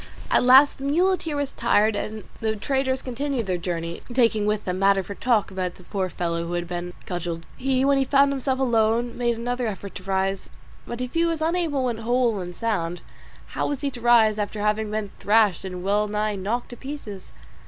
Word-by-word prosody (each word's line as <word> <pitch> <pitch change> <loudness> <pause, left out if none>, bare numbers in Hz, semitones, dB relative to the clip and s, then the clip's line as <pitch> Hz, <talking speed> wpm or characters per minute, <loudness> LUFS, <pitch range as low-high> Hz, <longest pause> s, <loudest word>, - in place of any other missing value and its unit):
At - - +5
last 265 +3 +6
the - - -7
muleteer 335 +1 +1
was 285 -1 -1
tired, 220 -2 +2
and 215 +1 -4 0.2
the 220 -1 -1
traders 265 +3 -1
continued 260 -1 -2
their 185 -2 -1
journey, 170 -1 -4
taking 230 -4 +2
with 210 0 0
them 180 0 -2
matter 195 0 +4
for 200 - -7
talk 220 -1 +1
about 185 -2 -3
the 185 - -16
poor 190 0 -2
fellow 170 -1 -2
who 175 - -4
had 175 0 -2
been 175 0 -5
cudgelled. 170 -2 -4
He 265 0 +1
when 280 0 +4
he - - +3
found 275 +1 +4
himself 265 -1 -1
alone 235 -2 +1
made 240 -1 0
another 245 +1 -2
effort 200 -1 -6
to 190 - -9
rise; 195 0 -1 0.4
but 240 +1 -5
if 250 -1 -4
he 330 - +2
was 335 -2 0
unable 320 -4 0
when 240 -3 -1
whole 235 -2 +1
and 180 -1 -6
sound, 175 -7 -2 0.5
how - - -2
was 285 -2 -3
he 280 -1 -1
to 245 - -9
rise 225 -3 +5
after 210 +1 -3
having 210 +1 0
been 215 -2 -3
thrashed 210 -3 +3
and 180 -1 -6
well 205 +2 +1
nigh 210 0 -1
knocked 210 +6 -2
to 245 - -9
pieces? 245 -9 -8
220 Hz, 205 wpm, -24 LUFS, 195-260 Hz, 0.5 s, last